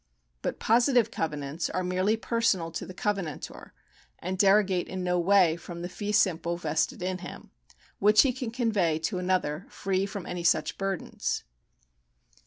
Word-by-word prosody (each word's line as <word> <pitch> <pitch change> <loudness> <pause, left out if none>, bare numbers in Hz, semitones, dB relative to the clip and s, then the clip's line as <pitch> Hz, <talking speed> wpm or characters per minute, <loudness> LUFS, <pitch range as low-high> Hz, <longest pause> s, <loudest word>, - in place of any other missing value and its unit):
But - - -3
positive 240 0 +3
covenants 150 0 -3
are 185 - -2
merely 185 +4 +1
personal 220 -8 0
to 160 - -5
the 185 - -8
covenantor, 195 -8 -4 0.5
and 185 +2 -4
derogate 195 -2 +4
in 185 -1 -4
no 180 0 +1
way 180 -2 +4
from 170 0 -8
the 175 - -4
fee 205 +2 -4
simple 170 -4 +2
vested 160 +1 -1
in 185 0 -2
him, 175 - -10 0.5
which 210 +2 +6
he 265 -3 +1
can 240 -1 -4
convey 215 -9 +1
to 160 +3 -2
another 180 -3 -1
free 195 0 -1
from 200 -2 -6
any 180 -1 -4
such 170 - +1
burdens. 195 -2 -2
185 Hz, 155 wpm, -28 LUFS, 170-205 Hz, 0.5 s, which